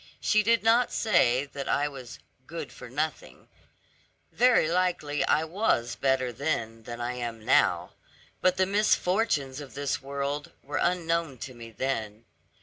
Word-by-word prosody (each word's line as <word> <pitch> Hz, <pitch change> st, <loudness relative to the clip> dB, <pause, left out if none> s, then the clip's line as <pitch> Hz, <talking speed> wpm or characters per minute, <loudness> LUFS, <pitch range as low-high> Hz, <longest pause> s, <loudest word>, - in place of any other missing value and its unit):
She 215 Hz, -, +3 dB
did 230 Hz, +1 st, +2 dB
not 230 Hz, +2 st, +4 dB
say 140 Hz, -, +3 dB
that 140 Hz, -1 st, -6 dB
I 145 Hz, -, +2 dB
was 130 Hz, -, -9 dB, 0.3 s
'good 160 Hz, -6 st, -6 dB
for 125 Hz, -, -10 dB
nothing;' 150 Hz, +5 st, -4 dB, 0.8 s
very 245 Hz, -9 st, +4 dB
likely 170 Hz, -4 st, 0 dB
I 155 Hz, -, +3 dB
was 160 Hz, -, 0 dB
better 130 Hz, -2 st, +1 dB
then 115 Hz, -5 st, -2 dB
than 120 Hz, 0 st, -7 dB
I 120 Hz, +1 st, -2 dB
am 120 Hz, -3 st, -5 dB
now; -, -, +3 dB, 0.5 s
but 185 Hz, 0 st, +3 dB
the 190 Hz, -, +3 dB
misfortunes 185 Hz, -, +1 dB
of 140 Hz, -2 st, -11 dB
this 140 Hz, -1 st, -2 dB
world, 140 Hz, +1 st, -4 dB
were 145 Hz, +1 st, -4 dB
unknown 170 Hz, -5 st, 0 dB
to 130 Hz, -, -10 dB
me 115 Hz, -1 st, -10 dB
then. 115 Hz, -3 st, -3 dB
145 Hz, 145 wpm, -28 LUFS, 125-180 Hz, 0.8 s, not